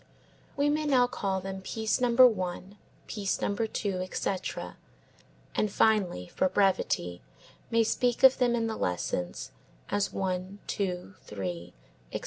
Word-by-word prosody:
We 285 +1 +3
may 300 +1 +1
now 255 -3 +5
call 195 -5 -2
them 190 0 -6
piece 220 +4 -1
number 245 +1 +7
one; 190 -2 -4 0.3
piece 200 -3 -2
number 220 +3 0
two, 200 -3 -2
etc., 185 +1 -3 0.8
and 210 - 0
finally, 195 - +2
for 185 - 0
brevity, 180 - +1 0.5
may 230 0 +3
speak 240 +2 0
of 265 0 +8
them 245 -2 +3
in 230 -1 0
the 220 -1 -3
lessons 90 0 -2 0.4
as 205 -1 +1
one, 185 +1 -3
two, 180 - -3
three, 90 -5 -6 0.4
etc. - - -2
200 Hz, 135 wpm, -29 LUFS, 180-230 Hz, 0.8 s, of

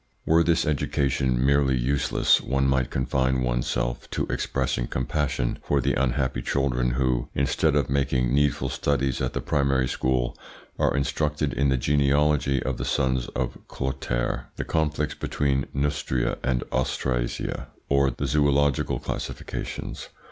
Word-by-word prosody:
Were 80 +1 +4
this 85 0 +2
education 70 -4 +1
merely 70 -2 +3
useless, 65 +3 +2
one 70 0 0
might 65 -2 +1
confine 65 0 0
one's - - 0
self - - -2
to - - -1
expressing 60 -2 -1
compassion 65 -1 -1
for 70 - +1
the - - +1
unhappy 65 0 0
children 65 -3 0
who, 65 -1 0
instead 70 +1 +1
of 70 -4 +2
making 65 -2 +1
needful 70 0 +2
studies 70 -2 0
at - - -1
the - - -2
primary 70 -3 +1
school, 65 -1 0 0.4
are - - +2
instructed 75 0 0
in 70 0 +2
the 65 - +2
genealogy 70 0 +2
of 65 -2 -2
the - - -3
sons 65 -1 0
of - - -2
Clotaire, 60 -2 -2
the - - -4
conflicts 75 -1 0
between 70 -2 -1
Neustria 70 -3 -1
and 65 -2 0
Austrasia, 60 -1 -1 0.2
or 70 -1 +3
zoological 70 -2 +2
classifications. - - -5
65 Hz, 135 wpm, -25 LUFS, 65-70 Hz, 0.4 s, Were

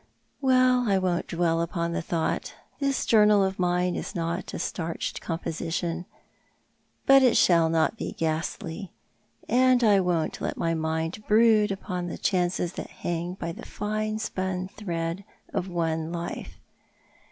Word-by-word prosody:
Well, 255 -3 +4
I 195 - +4
won't 180 -2 0
dwell 165 -1 +1
upon 170 0 -2
the - - -1
thought. 165 -1 -2 0.2
This 275 -1 0
journal 210 -2 +5
of 190 0 -2
mine 180 0 +1
is - - -5
not 170 +1 -2
a - - -5
starched 165 -1 -3
composition, 165 +1 -3 1.0
but 275 0 +7
it 255 -3 +5
shall 170 -2 +5
not 165 +7 +1
be - - -4
ghastly. 165 +3 -3 0.5
I 245 -4 +4
won't 175 -3 0
let - - -2
my 165 0 0
mind 160 +4 -2
brood 215 -1 +5
upon 185 -2 -4
the 175 - -5
chances 180 -1 0
that - - -6
hang 175 +1 -4
by 170 -3 -4
the - - -9
fine 215 +1 -2
spun 185 -3 -3
thread 175 -3 -4 0.3
of 180 - -1
one 165 -2 -1
life. 170 0 -5
180 Hz, 140 wpm, -26 LUFS, 165-210 Hz, 1.0 s, but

